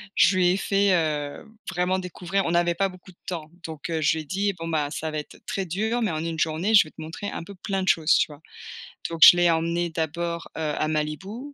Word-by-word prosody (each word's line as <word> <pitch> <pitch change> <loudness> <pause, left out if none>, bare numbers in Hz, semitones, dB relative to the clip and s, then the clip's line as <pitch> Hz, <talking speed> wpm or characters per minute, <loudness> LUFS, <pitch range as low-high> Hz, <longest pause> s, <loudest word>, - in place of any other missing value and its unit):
je 190 - +5
lui 180 -1 +4
ai 185 - +2
fait, 200 0 +2
heu, 150 -4 -1 0.2
vraiment, 185 +1 0
découvrir. 180 +1 -2
On - - 0
n'avait 175 0 +2
pas 195 +2 +1
beaucoup 185 +1 -14
de 175 - -26
temps, 160 -4 -5
donc 160 -3 -8
je 160 -1 +2
lui - - -3
ai - - -11
dit: 200 +5 -1
«Bon, 165 - -5
bah, 150 -3 0
ça 160 0 -4
va 155 - -2
être 150 - -10
très 195 -1 -3
dur 220 +7 -1
mais 215 - +1
en 155 +1 -3
une 165 -1 -4
journée 165 +8 0
je - - +8
vais - - -14
te - - -21
montrer 165 +6 -6
un - - -6
peu 200 - -10
plein 195 0 -3
de - - -5
choses», 160 -1 +4
tu - - +2
vois? 150 0 -13 0.7
Donc 165 -1 -6
je 175 - +11
l'ai 175 -1 +4
emmené 170 +1 0
d'abord, 170 +1 -3
heu, - - -3 0.2
à 155 - 0
Malibu, 190 - -4
170 Hz, 250 wpm, -25 LUFS, 160-190 Hz, 0.7 s, je